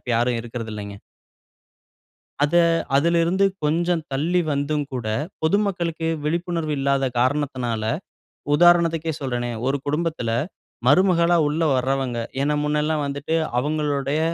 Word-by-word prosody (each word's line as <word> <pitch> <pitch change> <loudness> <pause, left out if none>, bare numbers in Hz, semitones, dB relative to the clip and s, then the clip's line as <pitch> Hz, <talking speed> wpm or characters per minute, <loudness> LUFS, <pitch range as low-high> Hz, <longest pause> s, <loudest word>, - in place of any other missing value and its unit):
இப்ப - - -6
யாரும் 120 0 +1
இருக்கறதுல்லேங்க. 110 -3 -6 1.5
அத, 150 +3 +1 0.4
அதிலருந்து 170 +5 +3 0.2
கொஞ்சம் 165 +2 +1
தள்ளி 165 +7 +1
வந்தும் 145 +1 0
கூட, 125 -3 -4 0.4
பொதுமக்களுக்கு 170 -3 0 0.2
விழிப்புணர்வு 165 0 -1
இல்லாத 135 0 +1
காரணத்தினால 130 -4 0 0.7
உதாரணத்துக்கே 165 -1 +4
சொல்றேனே! 120 -3 -2 0.2
ஒரு 135 +1 +1
குடும்பத்தில 150 -5 -1 0.6
மருமகளா 175 +2 +4
உள்ள 150 +3 -1
வர்றவங்க 130 -1 -1 0.2
ஏன்னா, 145 +2 +1
முன்னல்லாம் 150 +1 0
வந்துட்டு, 140 +3 -2 0.2
அவுங்களுடைய 145 0 -1
150 Hz, 100 wpm, -23 LUFS, 135-165 Hz, 1.5 s, உதாரணத்துக்கே